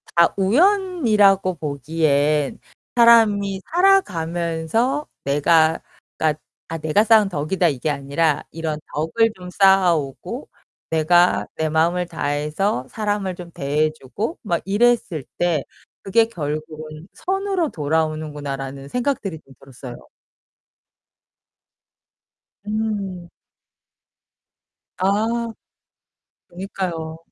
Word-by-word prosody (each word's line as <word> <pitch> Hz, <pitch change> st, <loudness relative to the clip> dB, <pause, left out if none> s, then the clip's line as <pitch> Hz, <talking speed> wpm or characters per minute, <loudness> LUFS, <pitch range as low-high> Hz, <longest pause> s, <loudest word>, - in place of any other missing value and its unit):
다 170 Hz, 0 st, +5 dB
우연이라고 220 Hz, -, +3 dB
보기엔 150 Hz, -1 st, 0 dB, 0.4 s
사람이 210 Hz, -5 st, +5 dB
살아가면서 205 Hz, -, +1 dB, 0.2 s
내가 160 Hz, +3 st, +3 dB, 0.4 s
그니까 155 Hz, -1 st, +1 dB, 0.3 s
아 165 Hz, -, -4 dB
내가 160 Hz, +7 st, +2 dB
쌓은 215 Hz, -3 st, +5 dB
덕이다 170 Hz, +3 st, 0 dB
이게 140 Hz, +2 st, -2 dB
아니라 145 Hz, +2 st, 0 dB
이런 160 Hz, -1 st, -4 dB
덕을 215 Hz, +10 st, +1 dB
좀 180 Hz, -1 st, -10 dB
쌓아오고 180 Hz, -8 st, +2 dB, 0.4 s
내가 175 Hz, +3 st, +3 dB
내 160 Hz, 0 st, -1 dB
마음을 170 Hz, +3 st, +1 dB
다해서 150 Hz, 0 st, -2 dB
사람을 205 Hz, -4 st, -2 dB
좀 175 Hz, -1 st, -10 dB
대해주고 155 Hz, -, -2 dB
막 170 Hz, -5 st, -1 dB
이랬을 205 Hz, -, +1 dB
때 170 Hz, -5 st, +1 dB, 0.4 s
그게 225 Hz, +4 st, +3 dB
결국은 155 Hz, -2 st, -6 dB
선으로 385 Hz, -4 st, -1 dB
돌아오는구나.'라는 145 Hz, -3 st, -3 dB
생각들이 240 Hz, -, -2 dB
좀 135 Hz, -, -17 dB
들었어요. 130 Hz, -2 st, -11 dB, 2.6 s
음. 205 Hz, -5 st, -3 dB, 1.7 s
아. 220 Hz, +5 st, 0 dB, 1.0 s
그니까요. 175 Hz, -3 st, -5 dB
170 Hz, 215 characters per minute, -21 LUFS, 155-205 Hz, 2.6 s, 다